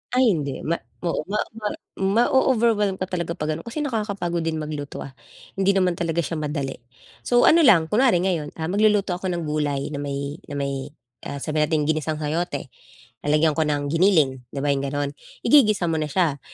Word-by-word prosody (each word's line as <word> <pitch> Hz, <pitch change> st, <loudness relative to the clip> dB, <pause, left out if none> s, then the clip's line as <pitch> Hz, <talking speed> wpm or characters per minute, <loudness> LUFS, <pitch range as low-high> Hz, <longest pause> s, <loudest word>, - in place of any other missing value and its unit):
Ay, 255 Hz, -3 st, +5 dB
hindi 140 Hz, -6 st, -3 dB
ma 170 Hz, +1 st, -1 dB, 0.2 s
ma 170 Hz, -, +1 dB, 0.2 s
ma 210 Hz, +2 st, -1 dB, 0.2 s
ma 210 Hz, -, -2 dB, 0.3 s
ma-o-overwhelm 225 Hz, 0 st, +3 dB
ka 190 Hz, -, -4 dB
talaga 170 Hz, -2 st, -2 dB
'pag 150 Hz, +1 st, -2 dB
ganon, 165 Hz, +8 st, -8 dB
kasi 295 Hz, +6 st, -3 dB
nakakapagod 205 Hz, -9 st, -2 dB
din 165 Hz, -1 st, -1 dB
magluto, 150 Hz, -2 st, -5 dB
ah, 135 Hz, -, -9 dB, 0.5 s
hindi 195 Hz, +1 st, +3 dB
naman 180 Hz, -3 st, +1 dB
talaga 170 Hz, 0 st, 0 dB
siya 160 Hz, +1 st, -3 dB
madali. 145 Hz, -3 st, -3 dB, 0.5 s
So, 245 Hz, 0 st, +4 dB
ano 330 Hz, -, +6 dB
lang, 165 Hz, -9 st, +5 dB
kunwari 230 Hz, -5 st, +4 dB
ngayon, 165 Hz, -6 st, -1 dB
ah, 160 Hz, 0 st, -3 dB
magluluto 205 Hz, -1 st, +3 dB
ako 185 Hz, -, -4 dB
ng 175 Hz, -2 st, -2 dB
gulay 150 Hz, -2 st, -1 dB
na 145 Hz, -, -4 dB
may 140 Hz, +1 st, -4 dB
na 145 Hz, -, -6 dB
may, 140 Hz, -1 st, -3 dB, 0.4 s
ah, 140 Hz, -, -6 dB
sabihin 155 Hz, 0 st, +1 dB
nating 155 Hz, -1 st, +1 dB
ginisang 155 Hz, 0 st, -2 dB
sayote, 150 Hz, -3 st, -2 dB, 0.5 s
lalagyan 150 Hz, +1 st, +3 dB
ko 160 Hz, -1 st, +2 dB
ng 145 Hz, -1 st, -1 dB
giniling, 160 Hz, -7 st, +3 dB
'di 140 Hz, -, -3 dB
ba, 145 Hz, -, +1 dB
yung 140 Hz, 0 st, 0 dB
ganon. 145 Hz, +1 st, -2 dB, 0.3 s
Igigisa 215 Hz, -8 st, +5 dB
mo 160 Hz, -, 0 dB
na 155 Hz, -, -1 dB
siya, 155 Hz, -4 st, +1 dB
165 Hz, 190 wpm, -23 LUFS, 145-195 Hz, 0.5 s, ano